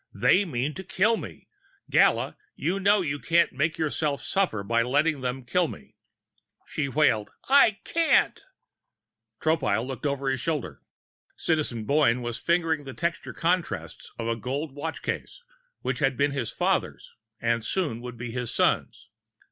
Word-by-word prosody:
"They 200 +2 +4
mean 140 -2 -2
to 190 - -7
kill 190 +5 +2
me. - - -9 0.4
Gala, - - +3 0.2
you 185 +4 -1
know 200 +1 +4
you 150 -4 -2
can't 170 +3 +3
make 155 +4 0
yourself 150 -2 -1
suffer 175 - 0
by 115 +3 +2
letting 145 +4 +1
them 125 0 -3
kill 175 +7 +2
me!" - - -11 0.7
She 140 -2 -2
wailed: 130 -7 +2 0.2
"I 265 -6 +6
can't!" 335 0 +2 1.0
Tropile 125 -9 +1
looked 135 +2 -3
over 140 -1 -1
his 130 - -1
shoulder. 140 - -3 0.6
Citizen 145 -9 -1
Boyne 135 -4 +3
was 120 -1 -3
fingering 165 -3 +1
the 135 - -8
textured 170 +1 -3
contrasts 175 0 -2
of 115 - -4
a 115 - +1
golden 135 +5 -4
watch 160 +3 -5
case 485 - -4 0.4
which - - -2
had 135 -4 +1
been 140 0 +2
his 130 -5 -2
father's - - -1 0.3
and 115 -1 0
soon 145 -7 -1
would 125 -1 -8
be 120 0 -5
his 125 -1 -3
son's. - - 0
145 Hz, 155 wpm, -26 LUFS, 125-165 Hz, 1.0 s, I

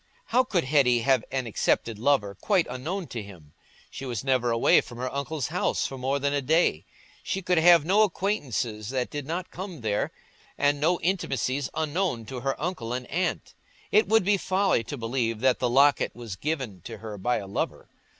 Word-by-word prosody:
How 255 - +4
could 190 -9 0
Hetty 130 -4 +3
have 130 -1 +3
an 130 -1 -1
accepted 115 0 0
lover, 120 -6 +2
quite 180 - +1
unknown 155 +10 -4
to 115 - -4
him? 90 -8 -13 0.4
She - - -8
was 120 -4 -3
never 130 -3 +1
away 115 0 +4
from 120 - -11
her 130 +1 -4
uncle's 140 0 -3
house 175 +3 0
for 135 - -4
more 135 +2 -1
than 140 0 0
a 145 - +1
day; 145 - +2 0.4
she 195 - -3
could 180 -1 +2
have 170 -2 +6
no 195 +5 +4
acquaintances 135 - -1
that 130 -1 -2
did 145 -2 -5
not 175 +3 -4
come 180 -5 -7
there, 105 -2 -1 0.5
and 145 0 +2
no 170 +3 +2
intimacies 135 - -1
unknown 155 -5 -1
to 125 +3 -6
her 135 +2 -2
uncle 150 -9 -3
and 125 0 -3
aunt. 180 +2 -2 0.4
It 215 -1 +4
would 220 +1 +4
be 200 +1 +3
folly 190 -9 +1
to 140 +6 -5
believe 115 -1 -1
that 130 -1 +3
the 125 - +1
locket 140 +3 +3
was 115 -5 -7
given 130 - -3
to - - -7
her 105 -1 -8
by 120 +6 +1
a 100 - -5
lover. 100 +1 -3
135 Hz, 195 wpm, -26 LUFS, 120-170 Hz, 0.5 s, have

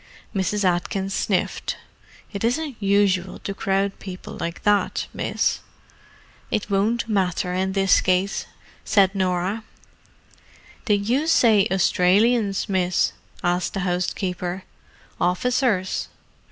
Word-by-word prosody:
Mrs. 200 +2 0
Atkins 190 +2 0
sniffed. 190 -2 -1 0.6
"It 200 - -4
isn't 270 +4 0
usual 195 -2 +2
to 200 - -5
crowd 195 0 -1
people 185 -2 -8
like 170 -1 -5
that, 205 -1 +2
miss." - - 0 0.9
"It 210 0 -2
won't 220 +4 +1
matter 185 -3 0
in 190 +1 -1
this 195 -1 +4
case," 185 +2 0 0.4
said 195 -2 +3
Norah. 190 +2 -1 1.2
"Did 205 -3 +1
you 275 +7 +1
say 225 -10 +5
Australians, 195 +3 +2
miss?" 185 -2 +1 0.3
asked 175 0 0
the 195 - -1
housekeeper. 180 0 -2 0.6
"Officers?" 200 +2 +1
195 Hz, 105 wpm, -23 LUFS, 180-210 Hz, 1.2 s, say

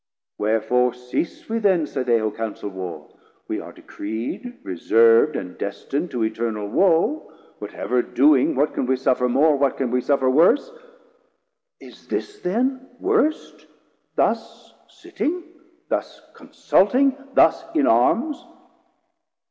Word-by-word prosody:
wherefore 115 +3 +1
cease 125 +6 -4
we 230 +1 -1
then? 190 -7 +2
Say 135 - -4
they 120 -2 +2
who 110 -1 -1
counsel 110 -2 -5
Warr, 95 -2 -7 0.4
we - - -3
are - - -9
decreed, 110 - -6 0.2
160 - - -18 0.3
Reserv'd 115 +6 +6
and 90 - -6
destin'd 140 - -4
to 120 -5 -2
Eternal 110 -1 -2
woe; 190 - +1 0.3
Whatever 125 0 -2
doing, 140 +2 +3
what 145 +3 +1
can 125 - -2
we 130 - +2
suffer 125 -1 +1
more, 145 +5 +3
What 140 -1 +1
can 130 -3 -2
we 125 0 +1
suffer 135 0 +1
worse? 175 - +3 1.1
is - - -15
this 415 0 -4
then 255 +7 -1
worst, 365 -5 -1 0.5
Thus - - -2
sitting, 350 +3 -4 0.4
thus - - -3
consulting, 260 +7 +1 0.2
thus - - +4
in 305 - +3
Arms? 235 - +2
130 Hz, 130 wpm, -22 LUFS, -, 1.1 s, Reserv'd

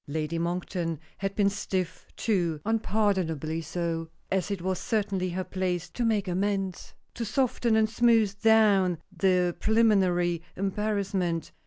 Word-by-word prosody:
Lady 155 +2 -2
Monkton 170 -1 -2 0.2
had 195 0 -2
been 205 -2 +3
stiff, 190 -3 -3
too; 175 -8 0
unpardonably 190 -8 0
so 165 0 -3 0.2
as 190 0 0
it 200 -2 -2
was 185 +1 -2
certainly 200 -4 -1
her 185 +2 -2
place 180 -2 -2
to 245 - -2
make 215 -4 +1
amends 190 0 -2 0.2
to 235 - -4
soften 235 0 +1
and 220 0 +4
smooth 220 -3 +2
down 205 -5 +4 0.2
the 180 -2 +2
preliminary 185 -6 +3
embarrassment. 195 -3 -1
190 Hz, 130 wpm, -28 LUFS, 175-210 Hz, 0.2 s, and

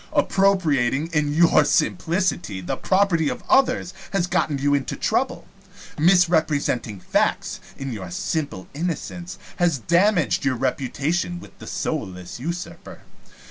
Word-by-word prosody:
Appropriating, 165 -7 +2
in 150 -2 +1
your 165 -2 +5
simplicity, 145 - 0
the 90 - -3
property 185 -5 +2
of - - -5
others 255 -8 +3 0.2
has 195 -3 +2
gotten 155 -5 0
you 145 +1 +1
into 140 -2 -1
trouble. - - -1 0.5
Misrepresenting 155 - +2
facts, - - 0 0.2
in 135 -2 -4
your 95 -5 -6
simple 115 - -3
innocence, 175 +3 -4 0.2
has 175 -4 +2
damaged 175 - +2
your 140 -2 +1
reputation 140 +8 -1
with - - -14
the - - -10
soulless 95 - -4
usurper. 170 +6 -6
155 Hz, 120 wpm, -23 LUFS, 135-175 Hz, 0.5 s, your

